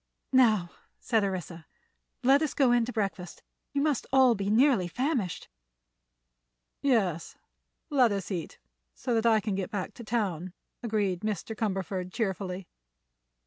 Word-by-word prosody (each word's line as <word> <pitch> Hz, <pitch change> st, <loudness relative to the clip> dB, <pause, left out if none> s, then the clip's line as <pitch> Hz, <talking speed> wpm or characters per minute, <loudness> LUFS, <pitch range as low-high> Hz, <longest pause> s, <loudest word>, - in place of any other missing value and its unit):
"Now," 215 Hz, -9 st, +4 dB, 0.3 s
said 225 Hz, -3 st, +1 dB
Orissa, 180 Hz, -4 st, -4 dB, 0.6 s
"let 270 Hz, +3 st, +5 dB
us 310 Hz, -4 st, -1 dB
go 265 Hz, -4 st, +4 dB
in 240 Hz, -1 st, +3 dB
to 250 Hz, -, -5 dB
breakfast. 195 Hz, -5 st, -4 dB, 0.3 s
You 280 Hz, 0 st, 0 dB
must 300 Hz, -4 st, 0 dB
all 260 Hz, -2 st, +6 dB
be 200 Hz, -2 st, -2 dB
nearly 230 Hz, -4 st, +4 dB
famished." 245 Hz, -, -2 dB, 1.3 s
"Yes; 200 Hz, -, 0 dB, 0.5 s
let 255 Hz, -6 st, +4 dB
us 200 Hz, 0 st, -3 dB
eat, 175 Hz, -4 st, -4 dB, 0.4 s
so 245 Hz, -, -2 dB
that 225 Hz, 0 st, +2 dB
I 220 Hz, -1 st, +5 dB
can 210 Hz, -1 st, -2 dB
get 190 Hz, -1 st, -2 dB
back 200 Hz, -3 st, -4 dB
to 240 Hz, -, -10 dB
town," 190 Hz, -6 st, -2 dB, 0.3 s
agreed 210 Hz, -6 st, 0 dB
Mr. 215 Hz, +1 st, -3 dB
Cumberford, 190 Hz, -3 st, -2 dB
cheerfully. 190 Hz, -3 st, -3 dB
215 Hz, 140 wpm, -28 LUFS, 185-245 Hz, 1.3 s, all